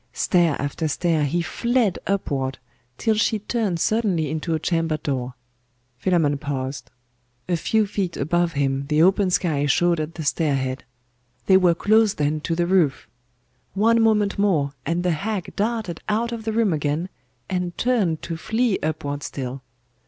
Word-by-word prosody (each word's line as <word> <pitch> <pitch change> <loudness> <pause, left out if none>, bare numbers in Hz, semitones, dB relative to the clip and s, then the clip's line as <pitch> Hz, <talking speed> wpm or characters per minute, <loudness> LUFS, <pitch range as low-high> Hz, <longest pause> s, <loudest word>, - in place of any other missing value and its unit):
Stair 170 -5 +2
after 145 +3 -2
stair, 160 -1 +1
he 170 +5 0
fled 235 +1 0
upward, 135 -9 -1 0.4
till 225 - +1
she 215 +1 +1
turned 210 -4 -2
suddenly 190 -8 +1
into 160 +1 -1
a - - -1
chamber 165 -2 0
door. 130 -4 -3 0.6
Philammon 150 -3 +1
paused. 130 -3 -4 0.6
A 180 - +1
few 215 +6 +1
feet 195 -3 -3
above 170 +4 +1
him 140 -1 -1
the 155 +2 +3
open 190 +1 +3
sky 155 -5 +1
showed 170 +4 +2
at 155 +1 -4
the 160 - -5
stair 145 0 +1
head. 130 0 -3 0.6
They 190 - +5
were 180 -3 +5
close 215 +3 +3
then 150 +1 0
to 165 - -1
the 175 +1 +1
roof! 170 -6 +1 0.7
One 230 +3 +4
moment 210 -3 +2
more, 160 -9 +2
and 170 +2 0
the 180 - +2
hag 195 +4 -3
darted 215 -5 -2
out 230 +3 0
of 230 -2 -6
the 220 - 0
room 220 -4 +2
again, 150 +3 -1 0.4
and 180 -1 -3
turned 210 -11 +1
to 165 -1 -4
flee 220 +4 0
upward 145 -2 -3
still. 130 -1 -5
170 Hz, 160 wpm, -23 LUFS, 145-205 Hz, 0.7 s, They